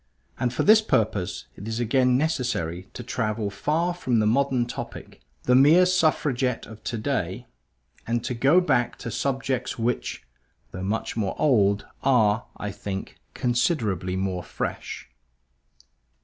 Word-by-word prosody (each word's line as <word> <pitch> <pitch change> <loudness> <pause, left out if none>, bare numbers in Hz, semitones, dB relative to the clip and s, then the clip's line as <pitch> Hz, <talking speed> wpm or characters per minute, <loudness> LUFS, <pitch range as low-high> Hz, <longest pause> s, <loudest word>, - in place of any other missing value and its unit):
And 125 -1 +1
for 125 - -1
this 215 +1 +7
purpose 100 - 0
it 100 - -9
is 115 +1 -2
again 125 +2 +3
necessary 125 - -1
to 120 - -6
travel 110 -3 -2
far 160 - 0
from 130 -9 0
the 110 - +3
modern 130 +2 +2
topic, 120 - -8 0.2
the 125 - +3
mere 150 +8 +7
Suffragette 150 -8 +1
of 110 -1 -12
today, 115 -2 -2 0.6
and 115 0 0
to 125 +1 -2
go 135 +9 +4
back 120 -9 +1
to 115 - -6
subjects 130 +2 -2
which, 120 +1 -2 0.5
though 90 - -6
much 100 +4 -2
more 100 -4 -1
old, 105 -8 +3 0.2
are, 115 -4 +3
I 105 - -4
think, 95 -1 -6 0.2
considerably 120 - 0
more 95 -1 -2
fresh. - - -5
120 Hz, 135 wpm, -25 LUFS, 105-135 Hz, 0.6 s, this